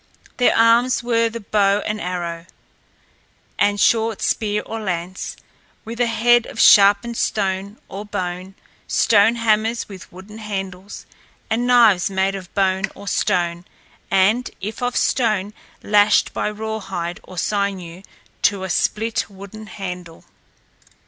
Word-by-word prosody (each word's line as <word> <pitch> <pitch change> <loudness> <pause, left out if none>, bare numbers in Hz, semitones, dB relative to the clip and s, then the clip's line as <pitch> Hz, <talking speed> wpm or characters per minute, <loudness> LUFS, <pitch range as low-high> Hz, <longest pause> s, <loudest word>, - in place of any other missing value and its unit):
Their 245 - +3
arms 235 +2 +4
were 230 -1 +1
the 230 +1 -7
bow 200 0 +2
and 210 0 -3
arrow, 170 -1 -4 1.1
a 205 0 +2
short 225 0 +2
spear 210 -1 0
or 225 - -5
lance, 185 -2 -4 0.5
with 230 +1 -7
a 240 - +3
head 235 +1 +3
of - - -9
sharpened 205 +4 +6
stone 195 0 -2
or 195 +2 -7
bone, 185 -2 -5 0.3
stone 220 +1 +3
hammers 225 0 0
with 190 -2 -12
wooden 195 +4 -12
handles, 195 -2 -6 0.5
and 240 +2 0
knives 225 -7 +5
made 190 0 0
of 190 -2 -8
bone 190 -1 +1
or 200 - -12
stone, 175 -2 0 0.5
and 210 +6 +2
if 210 +5 -6
of 245 0 -1
stone, 215 -5 +1 0.3
lashed 205 0 +3
by - - -1
rawhide 210 -5 -5
or 185 - -13
sinew 190 -2 -2 0.4
to 200 -2 +1
a 190 - -3
split 225 +6 0
wooden 200 +2 -11
handle. 180 -5 -8
205 Hz, 130 wpm, -20 LUFS, 190-225 Hz, 1.1 s, sharpened